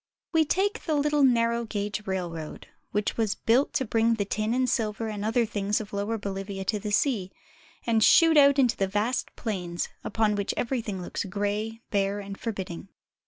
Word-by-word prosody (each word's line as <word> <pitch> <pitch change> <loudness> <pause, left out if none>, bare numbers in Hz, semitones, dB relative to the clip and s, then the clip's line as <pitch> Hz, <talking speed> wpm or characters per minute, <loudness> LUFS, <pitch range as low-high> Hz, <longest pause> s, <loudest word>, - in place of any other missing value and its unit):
We 320 -1 +4
take 405 +7 0
the 310 - +1
little 295 0 +2
narrow 235 -3 +3
gauge 210 -1 -4
railroad, 175 -5 -4 0.3
which 210 0 -1
was 220 -3 +1
built 245 +5 +2
to 265 - 0
bring 230 +1 +2
the 205 -2 -1
tin 215 +2 -1
and 255 +1 +1
silver 220 -2 -1
and 205 -1 -4
other 230 +2 +2
things 205 -1 -1
of 210 -2 -8
Lower 205 +3 -1
BoHvia 195 -1 -5
to 210 +2 0
the 210 - -4
sea, 205 -4 +1 0.5
and 225 -2 +3
shoot 330 +5 +6
out 280 -1 +6
into 240 -7 +2
vast 210 +6 -1
plains, 180 -6 -3
upon 220 -1 +1
which 200 -1 -2
everything 225 -7 -2
looks - - -3
gray, 205 +3 -3
bare, 200 0 +1
and 200 -1 -7
forbidding. 190 -6 -5
215 Hz, 175 wpm, -27 LUFS, 200-235 Hz, 0.5 s, shoot